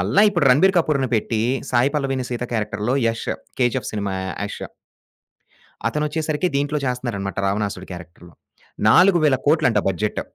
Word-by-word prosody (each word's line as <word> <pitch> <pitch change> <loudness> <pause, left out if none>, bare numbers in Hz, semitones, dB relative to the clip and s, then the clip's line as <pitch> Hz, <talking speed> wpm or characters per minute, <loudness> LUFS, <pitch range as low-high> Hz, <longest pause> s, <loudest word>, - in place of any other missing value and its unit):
మల్ల 100 +9 -2
ఇప్పుడు 170 -7 +1
'రణబీర్ 185 +9 +4
కపూర్‌ని' 140 -6 0
పెట్టి 110 0 -1 0.3
'సాయి 125 +3 +2
పల్లవిని' 135 -3 -1
'సీత' 125 0 -3
క్యారెక్టర్‌లో 105 +3 -1
'యష్ 115 0 -2 0.3
కేజీఎఫ్' 120 -2 0
సినిమా 100 -2 -3 0.3
యష్. - - -7 1.2
అతనొచ్చేసరికి 150 +4 -1
దీంట్లో 145 +1 0
చేస్తున్నారన్నమాట 120 -7 -3
రావణాసురుడి 100 -2 -3
క్యారెక్టర్‌లో 85 0 -12 0.6
40000000000 150 - +4
బడ్జెట్. 100 +3 -2
125 Hz, 115 wpm, -21 LUFS, 105-150 Hz, 1.2 s, రణబీర్